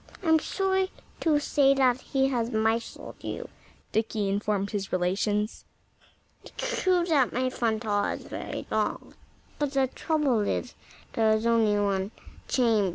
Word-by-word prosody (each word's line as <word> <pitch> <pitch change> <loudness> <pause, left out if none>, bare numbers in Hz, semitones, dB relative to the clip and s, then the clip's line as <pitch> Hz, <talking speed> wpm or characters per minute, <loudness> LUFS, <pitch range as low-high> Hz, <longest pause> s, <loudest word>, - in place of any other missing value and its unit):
"I'm 320 -2 +5
sorry 380 +2 0 0.3
to 310 -3 +3
say 280 -2 +3
that 260 -2 +3
he 270 -1 +1
has 235 -3 0
misled 225 0 -1
you," - - -5 0.4
Dickie 215 -2 0
informed 200 0 0
his 200 -2 -3
relations. 205 +4 0 0.8
"It's - - -12 0.3
true 365 -2 +3
that 295 -7 +3
my 255 +1 0
front 225 -2 -1
hall 205 -2 +1
is - - -3
very - - -6
long. - - -1 0.5
But 290 -1 -1
the 270 -1 +3
trouble 285 -2 0
is, 210 +4 -1 0.4
there's 220 0 +2
only 225 -3 +3
one 195 -1 0 0.4
chamber." 225 -6 +3
230 Hz, 140 wpm, -27 LUFS, 210-275 Hz, 0.8 s, I'm